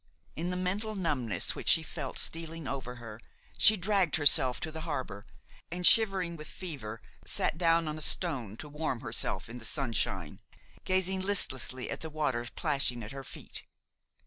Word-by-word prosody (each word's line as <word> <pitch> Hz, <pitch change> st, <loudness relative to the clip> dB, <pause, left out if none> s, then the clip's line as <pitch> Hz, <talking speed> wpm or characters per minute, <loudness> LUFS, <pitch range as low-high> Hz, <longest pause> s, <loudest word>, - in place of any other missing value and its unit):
In 170 Hz, +3 st, -3 dB
the 180 Hz, -, -2 dB
mental 200 Hz, +4 st, -2 dB
numbness 145 Hz, -, -1 dB
which -, -, -2 dB
she -, -, +5 dB
felt -, -, -5 dB
stealing 165 Hz, -2 st, -3 dB
over 130 Hz, -3 st, -4 dB
her, 115 Hz, -3 st, -9 dB, 0.4 s
she 215 Hz, -, +7 dB
dragged 190 Hz, -3 st, +2 dB
herself 140 Hz, -5 st, +6 dB
to 160 Hz, -, -3 dB
the 160 Hz, 0 st, -7 dB
harbor, 130 Hz, -, -5 dB, 0.4 s
and, 180 Hz, +1 st, -3 dB
shivering 195 Hz, -6 st, +6 dB
with 155 Hz, -1 st, -9 dB
fever, 130 Hz, -, -6 dB, 0.2 s
sat -, -, 0 dB
down 165 Hz, -1 st, +2 dB
on 155 Hz, 0 st, -4 dB
a -, -, -9 dB
stone 130 Hz, -, -1 dB
to 150 Hz, -, -7 dB
warm 150 Hz, -5 st, -3 dB
herself 110 Hz, -5 st, 0 dB
in 120 Hz, +2 st, -8 dB
the -, -, -12 dB
sunshine, 120 Hz, -3 st, -1 dB, 0.4 s
gazing 190 Hz, 0 st, +1 dB
listlessly 130 Hz, -10 st, -1 dB
at -, -, -4 dB
the 160 Hz, -, -5 dB
water 140 Hz, -6 st, -1 dB
plashing 140 Hz, -7 st, +1 dB
at 105 Hz, -, -8 dB
her 135 Hz, 0 st, -7 dB
feet. -, -, -9 dB
155 Hz, 170 wpm, -30 LUFS, 125-180 Hz, 0.4 s, she